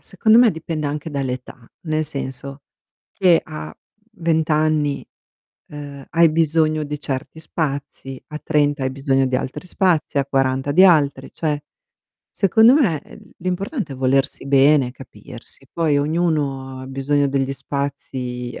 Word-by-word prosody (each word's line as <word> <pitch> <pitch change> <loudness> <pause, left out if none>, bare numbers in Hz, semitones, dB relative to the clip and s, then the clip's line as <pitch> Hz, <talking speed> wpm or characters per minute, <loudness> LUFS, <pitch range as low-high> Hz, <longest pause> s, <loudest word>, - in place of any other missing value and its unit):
secondo 220 +4 +3
me, 240 -2 +6
dipende 160 -2 -4
anche 150 +2 -4
dall'età, 130 -3 -5
nel 155 -2 -1
senso 140 -1 -2 0.5
che 180 -4 +4
a 75 +1 -8 0.4
20 160 -1 +1
anni, 150 -2 +1 0.6
uhm, 145 -2 -9
hai 170 0 +5
bisogno 155 -1 +1
di 150 0 -5
certi 140 +2 -5
spazi, 140 -4 -4
a 150 -1 -7
30 145 -2 +1
hai 130 - -1
bisogno 135 0 +1
di 130 - 0
altri 150 +7 -4
spazi, 170 -6 +1
a 140 - +2
40 135 0 0
di 180 +6 +6
altri, 145 -6 +3
cioè, 150 -2 -2 0.7
secondo 220 +5 +5
me, 185 - +2
uhm, - - -15
l'importante 185 - -3
è - - -10
volersi 135 +2 0
bene, 140 -2 +4
capirsi. 130 -1 -11
Poi, 155 -4 +1
ognuno 145 -4 -1
ha - - -8
bisogno 140 +2 0
degli 135 0 0
spazi 130 -3 -4
145 Hz, 140 wpm, -20 LUFS, 135-160 Hz, 0.7 s, me